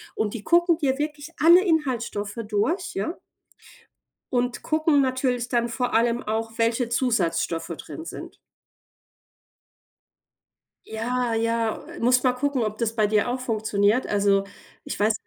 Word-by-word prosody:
Und 210 -2 -1
die 215 -4 -6
gucken 345 -1 +3
dir 270 -3 +1
wirklich 295 +1 -4
alle 345 +3 +7
Inhaltsstoffe 245 - -1
durch, 225 - -1
ja? 210 - -3 1.2
Und 245 0 -1
gucken 310 -2 +2
natürlich 255 -2 0
dann 240 -1 +1
vor 245 +2 -2
allem 235 +1 +2
auch, 225 +1 -3
welche 230 +1 +1
Zusatzstoffe 175 -10 0
drin 325 - -8
sind. - - -9 2.5
Ja, 240 +2 -2
ja, 230 0 0 0.2
musst 250 +2 +3
mal 250 - +4
gucken, 270 0 -1
ob 215 0 -3
das 230 -1 -1
bei 215 -2 +2
dir 215 +3 +1
auch 255 - -2
funktioniert. 220 -1 +1
Also, 200 -1 +2 0.4
ich - - -6
weiß 215 +2 +3
235 Hz, 135 wpm, -24 LUFS, 220-265 Hz, 2.5 s, alle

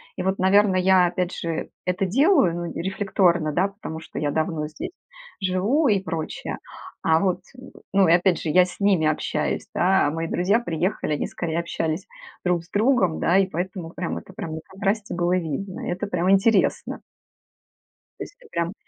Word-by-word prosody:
И - - -3
вот, 190 +1 0
наверно, 195 +1 +4
я 185 -1 +5
опять 180 +1 -2
же 165 -1 -3
это 180 +1 0
делаю, 245 - +3
но 175 0 -3 0.2
рефлекторно, 180 -4 +1
да, 185 +6 +1
потому 195 -5 -7
что 165 - -8
я 150 - 0
давно 155 0 -1
здесь 155 - -7 0.5
живу 200 +11 +2
и 205 -4 +3
прочее. 165 -4 -4 0.4
А 160 0 +3
вот 185 0 0 0.5
ну, 195 -2 +5
и - - +4
опять 175 0 +3
же, 160 - -3
я 180 +4 +5
с 180 - -11
ними 195 -6 +3
общаюсь, 155 - -1
да, 190 -2 +3
а - - 0
мои 165 +1 -3
друзья 185 +7 +2
приехали, 175 -5 -2
они 150 - -1
скорее 165 -1 -3
общались 165 +1 -2 0.4
друг 175 -2 +1
с 170 - -22
другом, 210 -6 +2
да, 175 - +3
и 195 - +2
поэтому 180 -1 -4
прям, 175 -1 -4
это - - -15
прям 160 - -6
на - - -5
контрасте 200 +2 -2
было 175 +1 +1
видно. 180 +3 -4
Это 180 +3 -2
прямо 180 -1 0
интересно. 195 +1 +2 1.2
То - - -3
есть - - -12
это 475 - -18
прям 170 +2 -1
180 Hz, 180 wpm, -24 LUFS, 165-195 Hz, 1.2 s, я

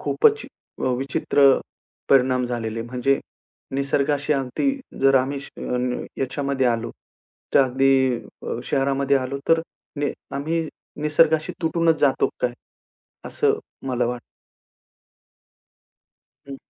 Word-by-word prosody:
खूपच 440 -1 +2 0.4
अ, - - +1
विचित्र 135 0 +3 0.5
परिणाम 130 -1 +4
झालेले. 115 -2 -3
म्हणजे 125 +3 0 0.6
निसर्गाशी 140 +2 +1
अगदी 135 - 0 0.3
जर 135 0 +5
आम्ही 135 +2 0
श 140 - -9
अ, - - -10 0.2
न, 125 0 -2
याच्यामध्ये 135 0 0
आलो, 115 -1 0 0.6
तर - - +7
अगदी 130 0 +3 0.3
अ, - - -3
शहरामध्ये 140 0 +1
आलो 130 +1 -2
तर 165 0 +5 0.4
ने 145 - 0 0.2
आम्ही 160 +2 -1 0.3
निसर्गाशी 155 +1 +3
तुटूनच 165 -1 +2
जातो 140 -2 +3
काय? 125 -1 +1 0.7
असं - - +1 0.3
मला 125 -2 0
वाटतं. 120 0 -4 2.3
हं. 135 - -6
135 Hz, 110 wpm, -23 LUFS, 125-145 Hz, 2.3 s, तर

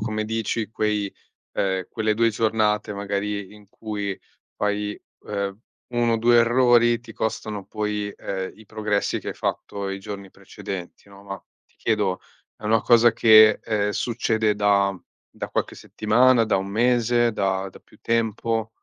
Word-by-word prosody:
come 110 0 -2
dici 110 -1 -2
quei, 105 -2 -1 0.4
ehm, 95 -2 -1
quelle 110 -1 0
2 115 +1 +3
giornate 110 -1 +1
magari 100 0 -3
in 105 -2 -17
cui 100 -3 -5 0.4
fai, 105 0 -2 0.2
ehm, 100 -1 -3 0.4
1 120 -1 +2
o - - +2
2 120 +1 +4
errori 120 0 +4
ti 115 -1 -13
costano 105 -2 -3
poi, 105 -1 -3
ehm, 95 -1 -4
i 110 - -16
progressi 105 -1 -1
che - - -7
hai - - -4
fatto 100 -1 -3
i 95 0 -4
giorni 100 -1 -8
precedenti, 95 +1 -8
no, 100 0 -15
ma 100 -1 -7 0.3
ti - - -36
chiedo: 105 -5 0 0.4
è - - -16
una 110 +1 +3
cosa 120 -1 +5
che, 110 -1 +7
ehm, 105 -2 0
succede 110 -1 0
da 100 -2 +2 0.3
da - - -6
qualche - - -2
settimana, 120 +2 +3
da 105 -3 +1
1 95 - -2
mese, 120 +2 +2
da 95 -1 -1
da - - -14
più - - -23
tempo? 115 -1 -1
105 Hz, 155 wpm, -23 LUFS, 100-115 Hz, 0.4 s, che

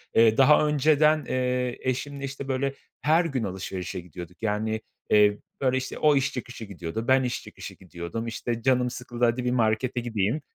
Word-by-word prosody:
Eee, 115 -1 +5
daha 150 +3 +6
önceden, 150 +1 +3
eee, 125 -1 -1
eşimle, 140 +2 -3
işte 140 0 -6
böyle, 135 +1 -1 0.3
her 160 +3 +3
gün 135 -7 -2
alışverişe 95 -1 -4
gidiyorduk. 90 0 -10
Yani, 110 +1 -1 0.3
eee, 105 -1 +5 0.2
böyle 130 -1 +2
işte, 130 - -4
o 150 -1 +4
iş 135 -1 +1
çıkışı 125 -2 -6
gidiyordu, 100 +3 -5
ben 130 0 +4
iş 125 -1 -3
çıkışı - - -9
gidiyordum, 90 +5 -6
işte 115 +1 -3
canım 125 0 +2
sıkıldı, 120 0 -2
hadi 120 +2 0
bir 125 - +1
markete 120 +1 +1
gideyim. 115 +3 -1
125 Hz, 170 wpm, -26 LUFS, 110-135 Hz, 0.3 s, daha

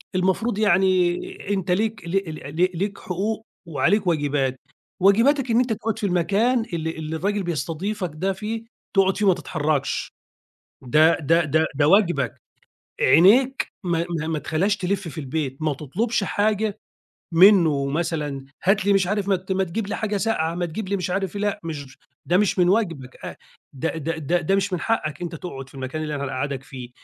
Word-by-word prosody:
المفروض 190 +4 +1
يعني 185 -2 +1
أنت 190 -2 -1
ليك 210 -1 -1
ل - - -4
ل 165 -5 -3 0.3
ل 185 - +4
ليك 195 +2 -2
حقوق 215 +5 -3 0.2
وعليك 185 +5 +1
واجبات، 145 -5 0 0.4
واجباتك 235 +7 +4
إن 230 - +3
أنت 245 -3 +1
تقعُد 225 +1 -3
في 210 - -1
المكان 205 +7 +2
اللي 160 -1 -2
اللي 160 0 -4
الراجل 200 +4 -1
بيستضيفك 175 - -3
ده 190 +5 -1
فيه، 220 +3 -5 0.3
تقعُد 195 -1 +3
فيه 210 - +1
ما 190 - +6
تتحرّكش، 150 -3 -2 0.7
ده 155 +6 +4
ده 165 +3 +3
ده 155 +2 +2
ده 145 +1 +3
واجبك، 175 - +2 0.6
عينيك 250 +10 +5 0.2
ما 170 -1 0
ما 155 - -3
ما 160 -2 -1
تخلّيهاش 190 +8 0
تلِف 190 -1 -2
في 165 - -9
البيت، 140 -1 -3
ما 155 -2 +1
تطلُبش 200 - -1
حاجة 210 +1 0 0.6
منّه 165 -7 +6
مثلًا، 150 -3 -2 0.2
"هات 195 +1 +2
لي" 200 - +5
مش 190 -2 +3
عارف 205 0 -1
"ما 190 -1 +1
ما 190 0 +2
تجيب 190 +4 -3
لي - - -3
حاجة 210 -2 -2
ساقعة، 170 -6 0
ما 175 0 -1
تجيب 190 +5 -5
لي" 200 - 0
مش 180 - -3
عارف 195 +1 -2
إيه، 205 - -3
لأ 205 -1 -1
مش 145 -4 -7 0.3
ده 175 - +3
مش 205 -2 +1
من 175 0 +4
واجبك 170 - 0
آآ - - -6 0.4
ده 160 +5 -2
ده 160 +1 -3
ده 170 +4 0
ده 190 +4 +1
مش 195 0 -1
من 180 - -1
حقّك، 165 -9 -1
أنت 170 -1 -4
تقعُد 135 -6 -7
في - - -20
المكان 135 +4 -4
اللي 150 -1 -3
أنا 140 -1 -3
هنقعَّدك 135 0 -3
فيه، 130 -3 -9
180 Hz, 185 wpm, -23 LUFS, 155-200 Hz, 0.7 s, ما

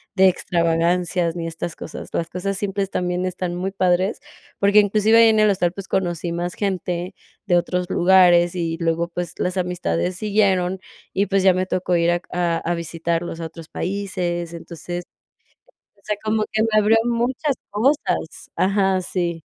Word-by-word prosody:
de 190 0 +6
extravagancias 170 0 0
ni 165 -1 -3
estas 165 0 -5
cosas. - - -8
Las 165 0 -2
cosas 195 +3 -3
simples 195 -1 -2
también 180 0 -1
están 180 -1 -3
muy 190 +2 -3
padres, 185 +1 +1 0.4
porque, 200 +1 +5
inclusive, 210 +2 +4
ahí 230 0 +7
en 220 -1 +3
el 215 -1 +5
hostal, 180 -3 +1
pues 195 0 -8
conocí 175 -3 -1
más 175 +1 -3
gente 180 -3 -3 0.3
de 175 -2 +4
otros 180 +1 -1
lugares, 175 -1 +5
y 165 -2 -2
luego, 170 0 0
pues 175 0 -4
las 180 +1 -1
amistades 180 - -1
siguieron, 190 -3 +1 0.3
y, 200 - +1
pues 195 -1 +1
ya 190 -1 +6
me 185 0 0
tocó 180 -1 -1
ir 170 0 +3
a 175 0 0
a 175 -2 0
a 175 - -2
visitarlos 170 0 -3
a 165 - -3
otros 165 0 -12
países. 175 -3 -3
Entonces, 170 +1 -6 0.9
o - - -30
sea, 210 -1 -1
como 215 0 +1
que 220 0 +1
me 225 - +1
abrió 215 +1 +5
muchas 255 +4 0
cosas 250 +9 -1
ajá, 195 -1 +2
sí. 175 -2 -2
180 Hz, 170 wpm, -21 LUFS, 170-200 Hz, 0.9 s, ahí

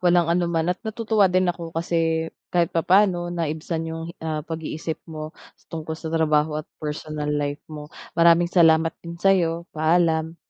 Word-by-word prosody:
walang 175 -2 +3
anuman 170 0 +1
at 185 - -15
natutuwa 220 -2 +1
din 185 +1 +2
ako 170 -1 -8
kasi 165 -1 0 0.2
kahit 175 -2 +1
papaano 175 +1 +3
naibsan 165 -1 -3
yung, 165 0 -5
ah, 155 -1 -3
pag-iisip 160 0 -5
mo 155 -2 -6 0.4
tungkol 160 -1 -5
sa 160 +1 -6
trabaho 155 -1 +2
at 155 - -4 0.2
personal 150 0 -4
life 145 -1 -1
mo. 150 -1 -9 0.2
Maraming 170 0 +5
salamat 165 -2 +4
din 170 0 -8
sa'yo. 170 -3 +2
Paalam. 160 0 +2
165 Hz, 150 wpm, -23 LUFS, 160-175 Hz, 0.4 s, Maraming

